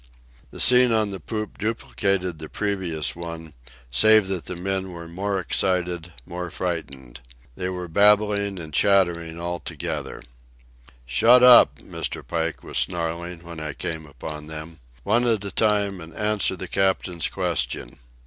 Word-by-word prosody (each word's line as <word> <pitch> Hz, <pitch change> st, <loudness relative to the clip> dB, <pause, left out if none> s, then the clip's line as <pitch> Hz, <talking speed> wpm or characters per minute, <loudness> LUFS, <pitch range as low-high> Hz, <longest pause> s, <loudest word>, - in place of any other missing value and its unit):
The -, -, -11 dB
scene 125 Hz, -1 st, +7 dB
on 110 Hz, -2 st, +2 dB
the 95 Hz, -, -5 dB
poop 110 Hz, +5 st, -5 dB
duplicated 100 Hz, -5 st, -1 dB
the 80 Hz, -1 st, -8 dB
previous 95 Hz, -7 st, -2 dB
one, 85 Hz, -2 st, -8 dB, 0.4 s
save 110 Hz, -, +5 dB
that 95 Hz, -3 st, -3 dB
the 90 Hz, -, -5 dB
men 95 Hz, +1 st, -3 dB
were 85 Hz, -1 st, -8 dB
more 95 Hz, +3 st, -2 dB
excited, 90 Hz, -2 st, -1 dB
more 90 Hz, 0 st, -5 dB
frightened. 70 Hz, -9 st, -5 dB, 0.3 s
They 90 Hz, +8 st, -4 dB
were 90 Hz, -1 st, -5 dB
babbling 100 Hz, +2 st, +3 dB
and 80 Hz, -3 st, -8 dB
chattering 85 Hz, -3 st, +2 dB
all 85 Hz, 0 st, -3 dB
together. 80 Hz, -3 st, -5 dB, 0.8 s
"Shut 120 Hz, -, +5 dB
up!" 125 Hz, -1 st, +8 dB
Mr. -, -, -5 dB
Pike 80 Hz, -1 st, -2 dB
was -, -, -2 dB
snarling 85 Hz, 0 st, -3 dB
when 85 Hz, -1 st, -9 dB
I 75 Hz, -2 st, -5 dB
came 80 Hz, +1 st, -5 dB
upon 75 Hz, +1 st, -8 dB
them. 80 Hz, +1 st, -8 dB, 0.2 s
"One 115 Hz, +4 st, +2 dB
at 110 Hz, -3 st, +1 dB
a 100 Hz, -, -5 dB
time, 100 Hz, -3 st, +1 dB
and 80 Hz, 0 st, -11 dB
answer 105 Hz, -2 st, +1 dB
the 95 Hz, +1 st, -6 dB
captain's 95 Hz, -2 st, 0 dB
question." -, -, -2 dB
90 Hz, 150 wpm, -24 LUFS, 80-100 Hz, 0.8 s, up